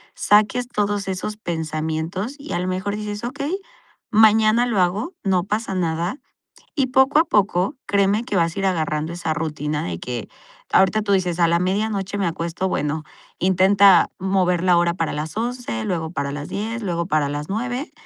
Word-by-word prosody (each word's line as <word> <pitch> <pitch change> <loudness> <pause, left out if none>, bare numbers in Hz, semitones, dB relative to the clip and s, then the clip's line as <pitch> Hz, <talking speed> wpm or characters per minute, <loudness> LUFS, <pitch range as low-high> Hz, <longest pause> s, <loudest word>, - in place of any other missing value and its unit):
saques 215 +4 +3
todos 205 -3 -1
esos 195 +3 -3
pensamientos, 160 - -3
y 290 +2 -7
a - - 0
lo 180 - -2
mejor 190 +2 -2
dices: 210 0 -5
"Okey, 285 +9 -3 0.5
mañana 220 +2 +5
lo 220 -5 0
hago, 200 - 0
no 185 -3 +2
pasa 210 0 -2
nada". 170 - -1 0.6
Y 270 -3 +2
poco 265 +3 +4
a - - +6
poco, 200 - +1
créeme 200 +2 +2
que 205 - -3
vas 165 -1 +1
a - - -3
ir 195 - 0
agarrando 160 -3 -1
esa 170 -2 -2
rutina 150 -2 -3
de 85 -1 -4
que 120 -3 -5 0.5
ahorita 190 +3 +4
tú 200 -1 +1
dices: 180 -2 0
"A 170 - +5
la 170 +1 +2
medianoche 200 +1 -1
me 195 -3 0
acuesto", 170 +2 -2
bueno, 150 -1 -1 0.4
intenta 190 +1 +5
mover 185 -2 +1
la 180 -2 +4
hora 170 0 +2
para 165 -3 -2
las 150 +1 -4
11, 240 - -3
luego 165 -3 -2
para 140 -5 -3
las 145 0 -6
10, 225 +3 -3
luego 170 -3 -1
para 155 -5 +1
las 145 +3 -4
9, 245 - -3
190 Hz, 180 wpm, -22 LUFS, 165-215 Hz, 0.6 s, a